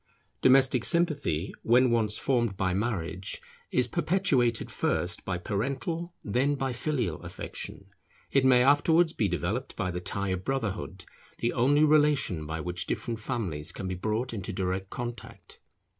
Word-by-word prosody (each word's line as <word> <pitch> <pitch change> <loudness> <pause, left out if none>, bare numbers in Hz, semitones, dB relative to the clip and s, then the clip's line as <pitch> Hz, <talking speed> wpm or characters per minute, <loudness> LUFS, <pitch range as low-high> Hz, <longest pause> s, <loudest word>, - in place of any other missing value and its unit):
Domestic 130 -2 +5
sympathy, 140 - +1
when 125 +2 +4
once 110 -3 +2
formed 120 -7 0
by 95 -1 0
marriage, 95 -3 -2 0.3
is - - +2
perpetuated 130 - +1
first 90 +3 -1
by 95 -2 -2
parental 135 - -3
then 130 +7 +1
by 135 -2 -2
filial 120 - -2
affection; - - -7 0.5
it 135 - +3
may 125 -1 +6
afterwards 160 +4 +4
be 105 - +1
developed 95 +8 -2
by 95 -4 -2
the 90 0 -4
tie 100 +2 -2
of 95 0 -2
brotherhood, 105 -6 -3 0.3
the 120 - -1
only 140 +5 +4
relation 145 - +3
by 80 +1 -3
which 90 +2 -3
different 115 -2 -3
families 100 - -2
can 95 - -6
be 95 - -2
brought 110 +7 -2
into 100 -2 -4
direct 95 0 -2
contact. 115 -4 -7
115 Hz, 145 wpm, -28 LUFS, 95-135 Hz, 0.5 s, may